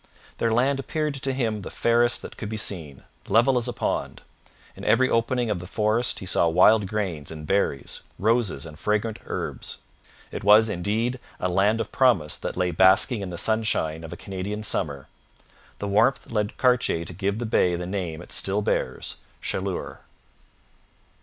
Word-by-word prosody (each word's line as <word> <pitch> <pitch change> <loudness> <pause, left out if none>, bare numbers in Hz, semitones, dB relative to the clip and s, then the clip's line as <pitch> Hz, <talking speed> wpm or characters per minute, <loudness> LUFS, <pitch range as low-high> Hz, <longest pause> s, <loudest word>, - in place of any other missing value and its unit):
Their 115 - +1
land 135 +4 +2
appeared 150 +2 -2
to 135 0 -3
him 115 -5 -1
the - - -7
fairest 120 +1 +2
that - - -9
could 105 - -6
be 110 - -4
seen, 80 -10 -3 0.2
level 120 +4 +4
as 120 0 +1
a - - -1
pond; - - -3 0.5
in - - -11
every 130 - +4
opening 115 0 +1
of 100 - -1
the 90 - -8
forest 110 +4 +1
he - - -7
saw 85 - +3
wild 95 +5 +5
grains 95 -8 -3
and 75 -1 -8
berries, 90 -6 -1 0.2
roses 110 - +1
and 75 -1 -11
fragrant 105 +1 -1
herbs. - - -5 0.5
It - - -6
was, 105 +2 +6
indeed, 110 +7 -1 0.2
a 90 - 0
land 100 +5 +2
of 115 - -3
promise 115 - +3
that - - -5
lay 90 -1 +1
basking 95 +6 +4
in 95 - -4
the 85 - -6
sunshine 95 -7 0
of 80 - -8
a 85 - -7
Canadian 100 +3 -5
summer. 70 -9 -2 0.7
The 100 - -4
warmth 110 +6 +2
led 105 -2 -1
Cartier 125 -10 +2
to 90 - -8
give 100 +3 -1
to - - -6
the - - -1
bay 90 -5 +2
the 90 +1 -4
name 90 -3 -4
it - - -13
still 100 +2 +3
bears - - -2 0.3
Chaleur. 95 -1 -3
105 Hz, 180 wpm, -25 LUFS, 90-115 Hz, 0.7 s, was